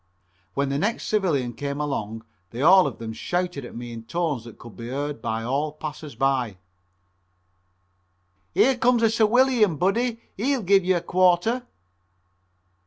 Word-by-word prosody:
When 140 0 0
the 140 +1 -1
next 215 +7 -1
civilian 155 - 0
came 140 +3 -4
along 115 -7 -3 0.2
they 120 +6 -4
all 185 +1 +7
of 130 - -6
them 110 -1 -6
shouted 175 +3 -2
at 120 - -10
me 120 0 -7
in 115 - -7
tones 150 -2 -2
that 115 - -11
could 115 -2 -12
be 115 - -8
heard 140 -1 -3
by 110 0 -2
all 140 +5 -1
passers 150 -2 -7
by: 125 -5 0 2.0
"Here 265 0 +4
comes 240 -1 +3
a 225 - +4
'ciwilian,' 230 - +3
buddy; 230 - 0 0.2
he'll 255 +3 0
give 195 0 +4
you 185 +1 +2
a - - -3
quarter." 185 +8 +2
155 Hz, 155 wpm, -24 LUFS, 125-200 Hz, 2.0 s, all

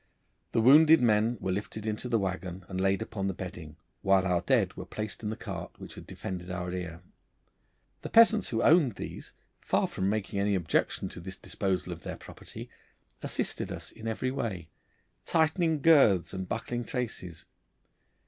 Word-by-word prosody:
The 115 - +2
wounded 155 +6 +8
men 115 0 +3
were 95 - -2
lifted 105 +2 -4
into 110 +3 -3
the 115 - +3
waggon 95 -2 -4
and 95 -1 -3
laid 95 +2 +2
upon 100 -3 -4
the 95 - -2
bedding, 85 -5 -8 0.3
while 95 -1 +3
our 90 -2 +2
dead - - +2
were - - -7
placed 105 -1 -5
in 105 - -3
the 110 - -3
cart 95 -7 -7
which - - -10
had - - -11
defended 90 -1 -6
our 90 -1 -3
rear. 90 -1 -5 1.0
The - - -6
peasants 225 -3 +6
who 115 -1 0
owned 150 - +5
these, - - -8 0.3
far - - +1
from 95 +1 -1
making 100 -1 -2
any 100 0 +2
objection 85 -4 0
to - - -9
this 95 +2 -7
disposal 95 -2 -2
of - - -11
their - - -6
property, - - -10 0.5
assisted - - -2
us - - -6
in 115 0 -8
every 120 +3 -1
way, 95 - -4 0.6
tightening 160 -1 +2
girths 135 - +5
and 95 -1 -5
buckling 120 +1 -3
traces. 115 - -5
100 Hz, 170 wpm, -29 LUFS, 95-120 Hz, 1.0 s, wounded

